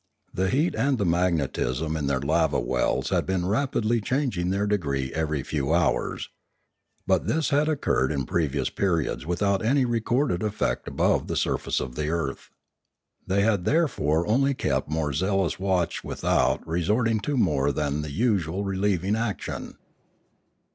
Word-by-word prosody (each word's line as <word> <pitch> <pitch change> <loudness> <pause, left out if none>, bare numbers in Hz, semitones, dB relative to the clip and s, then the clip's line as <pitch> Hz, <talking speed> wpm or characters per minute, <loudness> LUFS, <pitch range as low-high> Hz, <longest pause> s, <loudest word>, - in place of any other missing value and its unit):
The 95 +1 0
heat 150 - +1
and 135 -1 +1
the 100 - 0
magnetism 80 -4 0
in 75 -3 -2
their 70 -1 +1
lava 80 +3 +2
wells - - 0
had - - 0
been 95 -2 0
rapidly 115 +1 +1
changing 120 -7 -1
their 100 +2 0
degree 70 -10 -1
every 75 -3 -1
few 70 -1 -2
hours. 85 -6 0 0.8
But 95 -3 +1
this 160 -1 +1
had 145 +2 +2
occurred 80 - +1
in 70 -3 -1
previous 70 -4 -1
periods 85 -6 -1
without 100 +4 +1
any 130 +4 +3
recorded 120 -2 0
effect 105 -1 -1
above - - +1
the - - -2
surface - - 0
of 65 -1 -5
the 75 +3 -2
earth. 80 -5 -3 0.8
They 100 +2 +2
had 105 -4 +2
therefore 85 - +1
only 135 +5 +2
kept 125 - -1
more 75 -2 -1
zealous 95 +3 0
watch 95 -3 0
without - - 0
resorting 105 +7 +1
to 145 +6 -2
more 70 - +2
than 75 +1 -1
the 75 - -5
usual 95 - 0
relieving 95 0 0
action. 110 -2 -4
95 Hz, 150 wpm, -25 LUFS, 75-110 Hz, 0.8 s, any